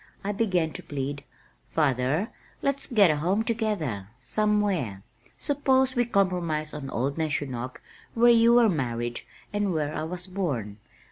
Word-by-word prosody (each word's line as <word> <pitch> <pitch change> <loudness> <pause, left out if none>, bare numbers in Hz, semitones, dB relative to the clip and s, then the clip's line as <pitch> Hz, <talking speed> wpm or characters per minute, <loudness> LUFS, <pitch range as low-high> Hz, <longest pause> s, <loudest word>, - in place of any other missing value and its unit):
I 200 - -1
began 185 -6 +1
to - - -5
plead 140 0 -4 0.5
"Father, 145 - +1 0.3
let's 275 0 +1
get 210 - +5
a 150 - 0
home 185 +8 +1
together, 205 - -2
somewhere. 185 - 0 0.3
Suppose 265 -2 +2
we 245 0 +3
compromise 180 -8 0
on 140 -3 -6
old 135 +6 -2
Neshonoc 135 -5 -2 0.4
where 240 +1 +6
you 235 0 +6
were 240 -2 +6
married 120 - -2 0.3
and 205 -2 0
where 155 -3 -1
I - - -3
was 175 +2 -4
born. 145 - -3
170 Hz, 140 wpm, -27 LUFS, 135-215 Hz, 0.5 s, where